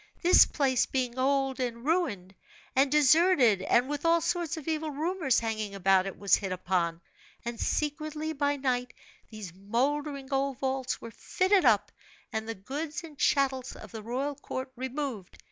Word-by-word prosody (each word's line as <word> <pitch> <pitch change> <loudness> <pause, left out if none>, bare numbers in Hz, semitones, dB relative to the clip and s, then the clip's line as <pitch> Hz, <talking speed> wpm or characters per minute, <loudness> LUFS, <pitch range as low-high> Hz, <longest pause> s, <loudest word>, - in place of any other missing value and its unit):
This 355 - +7
place 265 -4 +1
being 255 -1 -2
old 270 0 +1
and 240 -1 -3
ruined, 255 - -1 0.4
and 270 +1 +3
deserted 295 - +5
and 240 +6 +2
with 290 0 -4
all 335 0 +4
sorts 335 -1 -2
of 315 - -8
evil 315 -1 -1
rumors 315 -1 0
hanging 215 -3 -3
about 195 0 +3
it, 195 - -6
was 200 -1 -1
hit 195 -2 -5
upon; 175 -2 -1 0.4
and 235 -1 -5
secretly, 305 +1 -2
by 285 -1 0
night, 250 -3 -2 0.3
these 210 -6 -9
mouldering 270 - -2
old 270 -1 0
vaults 265 -1 -2
were 230 - -8
fitted 375 - +1
up, 215 -4 +3 0.4
and 220 0 -3
the 225 - -3
goods 295 - -5
and 305 -4 -12
chattels 265 -2 +1
of - - -11
the 220 -2 -7
royal 255 +6 -2
court 260 -1 -6
removed. 260 -5 -5
265 Hz, 160 wpm, -29 LUFS, 225-295 Hz, 0.4 s, This